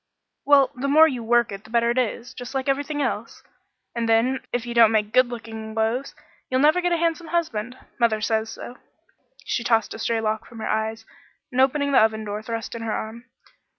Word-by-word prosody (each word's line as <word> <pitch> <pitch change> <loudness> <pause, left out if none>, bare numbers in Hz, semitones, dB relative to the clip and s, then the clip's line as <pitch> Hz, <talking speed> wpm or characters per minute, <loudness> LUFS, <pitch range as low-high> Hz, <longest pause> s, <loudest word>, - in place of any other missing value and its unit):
"Well 280 -1 +5
the 260 +3 -3
more 310 +3 +7
you 250 -6 -4
work 235 0 +2
it 195 0 -7
the - - -16
better 235 0 +2
it 240 - -3
is, 240 0 -3
just 245 +2 -8
like 265 0 -2
everything 285 +2 -1
else; 230 -3 -4 0.5
and 235 -1 -2
then 240 +4 +3
if 245 0 -2
you 240 - -5
don't 230 -2 +6
make 215 -1 0
good 255 0 +5
looking 225 -2 -7
loaves, 225 +5 -1 0.3
you'll 255 - +1
never 305 +6 +4
have 355 0 0
a 340 - +2
handsome 335 0 -1
husband. 255 -8 -2 0.2
Mother 230 -3 +2
says 220 +1 0
so." 245 - -9 0.7
She 235 - -2
tossed 225 -2 +1
a - - -8
stray 230 0 0
lock 220 0 -2
from 235 - -13
her 220 - -4
eyes, 220 +1 -2 0.5
and 255 +1 +2
opening 280 +2 +2
the 270 - +6
oven 220 0 +1
door 210 0 -4
thrust 225 0 -5
in 230 - -6
her 225 -1 -3
arm. 225 +3 -5
235 Hz, 215 wpm, -23 LUFS, 220-265 Hz, 0.7 s, more